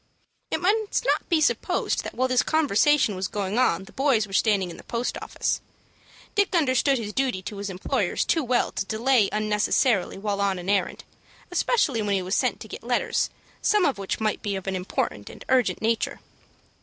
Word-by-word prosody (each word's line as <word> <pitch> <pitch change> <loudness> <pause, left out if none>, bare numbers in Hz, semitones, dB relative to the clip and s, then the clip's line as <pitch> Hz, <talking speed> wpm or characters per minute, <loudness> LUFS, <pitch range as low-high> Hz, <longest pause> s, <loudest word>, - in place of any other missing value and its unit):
It - - -1
must 420 +5 +1
not - - +1
be 335 -3 +3
supposed 310 - 0
that - - -7
while 255 +1 +1
this 255 -1 +3
conversation 295 -5 +3
was 185 0 -2
going 205 +2 -2
on 190 -8 +2
the 205 - -14
boys 265 -6 +2
were 195 - -12
standing 195 -4 +2
in - - -10
the - - -12
post 235 +1 -3
office. - - -2 0.7
Dick 405 -2 +1
understood 275 -3 +3
his 210 -3 -5
duty 255 -8 -1
to 205 - -6
his 200 0 -4
employers 185 0 -1
too 320 - +1
well 245 -1 +1
to - - -3
delay 225 0 +2
unnecessarily 210 0 +1
while 200 0 -2
on 195 -2 +1
an 180 +1 -5
errand, 200 -2 0 0.5
especially 345 - +1
when 205 -1 0
he 190 - -1
was 185 +2 -3
sent - - +1
to - - -8
get - - -8
letters, - - 0 0.3
some 420 -4 +3
of 270 -7 0
which 195 - -3
might 215 -1 -1
be 205 -2 -2
of 190 - -5
an 195 -1 -2
important 180 - -3
and - - -12
urgent 255 -4 +2
nature. 225 0 0
220 Hz, 195 wpm, -25 LUFS, 195-270 Hz, 0.7 s, be